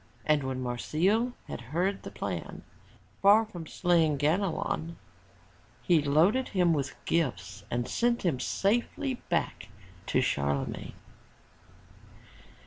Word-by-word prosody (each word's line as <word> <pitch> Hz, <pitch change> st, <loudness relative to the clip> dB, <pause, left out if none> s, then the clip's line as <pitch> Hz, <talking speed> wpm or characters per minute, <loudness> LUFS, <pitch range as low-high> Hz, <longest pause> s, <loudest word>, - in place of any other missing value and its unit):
And 150 Hz, -1 st, +3 dB
when 130 Hz, -1 st, -3 dB
Marsile 185 Hz, -, 0 dB
had -, -, -6 dB
heard 175 Hz, +11 st, -1 dB
the -, -, -7 dB
plan, -, -, -5 dB, 0.6 s
far 210 Hz, +3 st, +6 dB
from 175 Hz, -7 st, -9 dB
slaying 165 Hz, -5 st, +2 dB
Ganelon, 165 Hz, +1 st, 0 dB, 0.9 s
he 170 Hz, -4 st, +4 dB
loaded 165 Hz, -, +3 dB
him 180 Hz, -4 st, +3 dB
with 140 Hz, -3 st, -2 dB
gifts 105 Hz, -, -1 dB
and 120 Hz, 0 st, -1 dB
sent 235 Hz, 0 st, +1 dB
him 150 Hz, -8 st, +1 dB
safely 240 Hz, -, -1 dB
back 170 Hz, -8 st, -1 dB, 0.4 s
to -, -, +2 dB
Charlemagne. 70 Hz, 0 st, -1 dB
165 Hz, 110 wpm, -29 LUFS, 135-200 Hz, 0.9 s, far